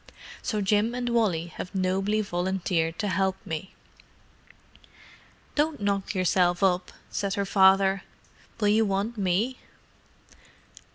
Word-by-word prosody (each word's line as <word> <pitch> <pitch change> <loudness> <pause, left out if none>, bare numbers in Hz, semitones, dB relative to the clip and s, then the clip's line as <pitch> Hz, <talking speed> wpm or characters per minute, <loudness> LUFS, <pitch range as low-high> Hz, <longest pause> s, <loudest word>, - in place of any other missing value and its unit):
So 215 -4 -2
Jim 210 +4 +1
and 245 -1 -2
Wally 210 -9 +1
have 185 - -6
nobly 195 +3 +1
volunteered 175 -3 -1
to 210 - -1
help 190 -1 +1
me." 165 +4 -5 1.8
"Don't 300 +1 0
knock 200 0 -1
yourself 180 0 +2
up," 185 -1 +2 0.2
said 200 -1 -2
her 200 - -1
father. 195 0 +4 0.6
"Will 210 -2 +2
you 220 +2 +4
want 200 +4 -1
me?" 205 +6 0
195 Hz, 115 wpm, -26 LUFS, 185-210 Hz, 1.8 s, father